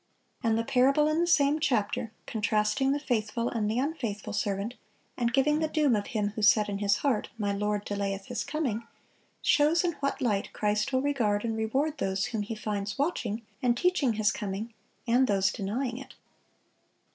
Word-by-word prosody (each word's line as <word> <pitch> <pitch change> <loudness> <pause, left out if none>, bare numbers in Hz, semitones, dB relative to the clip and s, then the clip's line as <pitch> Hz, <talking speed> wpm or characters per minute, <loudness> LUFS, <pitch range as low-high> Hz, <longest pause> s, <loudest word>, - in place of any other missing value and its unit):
And 225 -1 +2
the 230 - 0
parable 275 +4 +3
in 310 +1 +1
the 345 - +1
same 295 -2 +3
chapter, 225 -5 0
contrasting 215 +4 +1
the 285 - 0
faithful 235 -3 -1
and 215 -3 -1
the 220 - -1
unfaithful 250 -9 -2
servant, 200 +2 -1 0.4
and 235 -1 0
giving 290 +4 +3
the 315 - +1
doom 300 -6 +2
of 205 -1 -2
him 210 -2 -1
who 215 +1 -6
said 210 0 +5
in 200 -1 -3
his 205 0 +2
heart, 250 -7 +1
"My 205 -2 -1
Lord 210 0 -1
delayeth 200 -1 -3
His 245 -3 -3
coming," 235 -8 -2 0.6
shows 305 +4 +4
in 350 - +1
what 275 0 -1
light 205 -5 -1
Christ 210 +2 0
will 260 0 +1
regard 235 -7 +1
and 225 -1 -1
reward 270 +8 -1
those 190 -2 0
whom 220 -3 -2
He 215 +2 -4
finds 205 -1 -3
watching, 240 -7 -1 0.2
and 240 -1 +2
teaching 335 -8 +2
His 215 -1 +2
coming, 210 +2 -4 0.3
and 250 +3 +4
those 195 -1 +2
denying 240 +5 -3
it. 270 - -11
225 Hz, 180 wpm, -28 LUFS, 210-275 Hz, 0.6 s, said